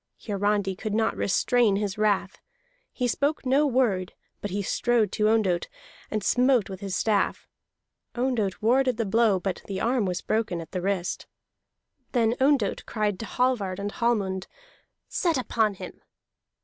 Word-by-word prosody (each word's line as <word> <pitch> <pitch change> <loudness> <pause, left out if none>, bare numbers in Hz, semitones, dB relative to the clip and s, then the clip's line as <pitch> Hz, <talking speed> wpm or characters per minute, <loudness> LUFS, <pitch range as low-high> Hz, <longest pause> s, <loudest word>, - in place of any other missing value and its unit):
Hiarandi 205 -2 0
could 215 +2 -3
not 220 0 +1
restrain 230 +1 +2
his 200 -1 -2
wrath. 205 -2 0 0.5
He 250 - -1
spoke 285 +5 0
no 275 +4 +3
word; 230 -9 +1 0.3
but 205 - -3
he 200 +2 -2
strode 230 0 +1
to 210 -1 +1
Ondott, 195 -6 +1 0.4
and 215 -2 -2
smote 250 -3 +3
with 190 - -7
his 195 -2 -4
staff. 205 0 0 0.7
Ondott 240 -6 -1
warded 255 +1 +3
the 230 - 0
blow, 210 -1 +3
but 190 0 -3
the 195 -1 -3
arm 240 0 +1
was 180 -1 -2
broken 215 -5 -1
at 165 -1 -9
the 180 - -3
wrist. 190 -2 -2 0.9
Then 230 -2 +3
Ondott 265 -7 +2
cried 210 -4 -1
to 225 - -5
Hallvard 225 -6 0
and 200 +1 -3
Hallmund: 200 -6 -1 0.6
"Set 335 -5 0
upon 220 -4 0
him!" - - -10
215 Hz, 150 wpm, -26 LUFS, 195-240 Hz, 0.9 s, no